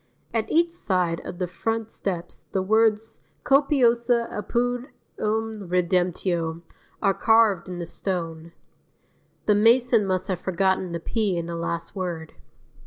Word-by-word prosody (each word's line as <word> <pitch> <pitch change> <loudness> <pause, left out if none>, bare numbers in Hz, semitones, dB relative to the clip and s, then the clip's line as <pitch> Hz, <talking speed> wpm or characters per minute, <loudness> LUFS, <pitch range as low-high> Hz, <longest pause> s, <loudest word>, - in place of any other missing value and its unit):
At 225 -2 0
each 335 +1 +3
side 180 - 0
of 175 - -6
the 180 - -1
front 225 +5 -3
steps 175 -3 -5
the 190 - -2
words 220 +2 +2 0.2
Copiosa 245 -4 +3
apud 245 +4 -1 0.3
eum 215 -2 -2
redemtio 175 -2 0 0.4
are 195 - +4
carved 220 -5 +3
in 180 - -5
the 175 - -4
stone. 165 -2 -4 0.9
The 210 - +4
mason 230 0 +4
must 185 -1 -1
have 185 -3 -2
forgotten 190 0 0
the 170 - -3
p 205 +1 -1
in 170 - -2
the 170 0 -5
last 170 0 -4
word. 170 -4 -4
195 Hz, 135 wpm, -25 LUFS, 175-225 Hz, 0.9 s, are